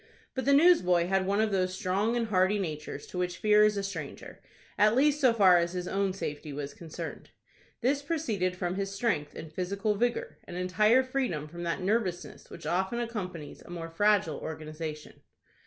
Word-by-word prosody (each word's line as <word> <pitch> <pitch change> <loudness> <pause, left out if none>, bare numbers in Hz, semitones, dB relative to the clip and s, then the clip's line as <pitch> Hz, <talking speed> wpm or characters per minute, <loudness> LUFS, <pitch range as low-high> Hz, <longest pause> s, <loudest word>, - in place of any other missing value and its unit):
But 260 - -3
the 280 - +4
newsboy 275 - +5
had 190 +1 +1
one 200 +1 +1
of 220 -1 +2
those 185 -1 0
strong 200 +6 0
and 230 -2 -1
hardy 190 +1 +3
natures 155 -6 -5
to 180 - -6
which 180 0 -2
fear 210 0 +5
is 210 -1 +3
a 200 - -1
stranger,—at 195 +4 -2
least 295 +3 +3
so 255 -3 +6
far 190 -6 +6
as 170 +1 -1
his 180 -1 -3
own 195 0 0
safety 150 -5 -5
was 140 0 -5
concerned. 160 -2 -8 0.5
This 275 +3 +1
proceeded 230 - -1
from 180 -1 -2
his 195 0 -2
strength 200 -8 -1
and 160 -1 -9
physical 200 +5 -1
vigor, 235 +3 -1
and 175 - -7
entire 210 +7 +3
freedom 255 - -2
from 170 +3 -9
that 170 +2 -2
nervousness 190 -2 -2
which 170 - -10
often 190 +6 0
accompanies 185 -10 -5
a - - -15
more 165 -1 -6
fragile 200 -4 +2
organization. 155 -1 -7
190 Hz, 180 wpm, -29 LUFS, 170-215 Hz, 0.5 s, so